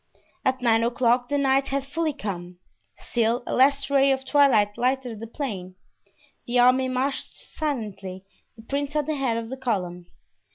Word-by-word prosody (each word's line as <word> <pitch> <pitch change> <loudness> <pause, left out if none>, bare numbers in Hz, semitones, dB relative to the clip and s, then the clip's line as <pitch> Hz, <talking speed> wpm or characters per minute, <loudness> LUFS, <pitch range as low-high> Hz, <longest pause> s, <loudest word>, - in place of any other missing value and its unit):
At 260 -1 0
nine 230 -1 +4
o'clock 245 +1 +2
the 285 - +1
night 270 -1 +2
had 275 0 -2
fully 315 +3 -1
come. 180 -9 -6 0.4
Still 235 +1 0
a - - -3
last 280 +2 +3
ray 275 0 +5
of 265 0 -1
twilight 260 -8 +4
lighted 250 -3 -1
the 230 - -7
plain. 200 -8 -5 0.7
The 240 +1 0
army 255 +2 +5
marched 260 +2 -2
silently, 205 -10 -5 0.3
the 225 - -14
prince 280 +4 -3
at 300 -1 +1
the 310 - -1
head 265 -5 0
of 230 -1 -5
the 265 - -5
column. 180 -9 -3
255 Hz, 165 wpm, -25 LUFS, 225-275 Hz, 0.7 s, ray